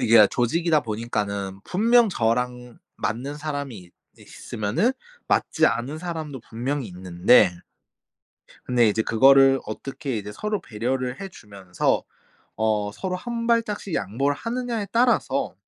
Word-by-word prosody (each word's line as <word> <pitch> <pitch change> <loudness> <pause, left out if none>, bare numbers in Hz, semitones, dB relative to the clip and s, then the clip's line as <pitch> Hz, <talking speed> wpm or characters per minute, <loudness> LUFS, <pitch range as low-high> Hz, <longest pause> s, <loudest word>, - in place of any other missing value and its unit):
이게 115 +1 +5
다 105 - +9
조직이다 155 - +1
보니까는 105 -4 -3
분명 230 +4 +4
저랑 125 -3 -1 0.2
맞는 130 +8 -3
사람이 145 -5 -4
있 90 -1 -15 0.3
있으면은 110 - -2 0.3
맞지 - - +1
않은 135 +6 -1
사람도 160 -6 -5
분명히 125 +3 -3
있는데... 90 +1 +3 1.1
근데 120 -2 +3
이제 105 +1 +1
그거를 135 +4 +5
어떻게 135 +3 -5
이제 105 0 -6
서로 210 - -3
배려를 125 +3 -3
해 195 - -5
주면서 100 - -2 0.5
어 105 -1 0
서로 185 - -4
1 235 +3 -4
발짝씩 215 -6 0
양보를 135 +8 -1
하느냐에 235 -3 -3
따라서... 230 - +1
125 Hz, 285 characters per minute, -24 LUFS, 110-170 Hz, 1.1 s, 다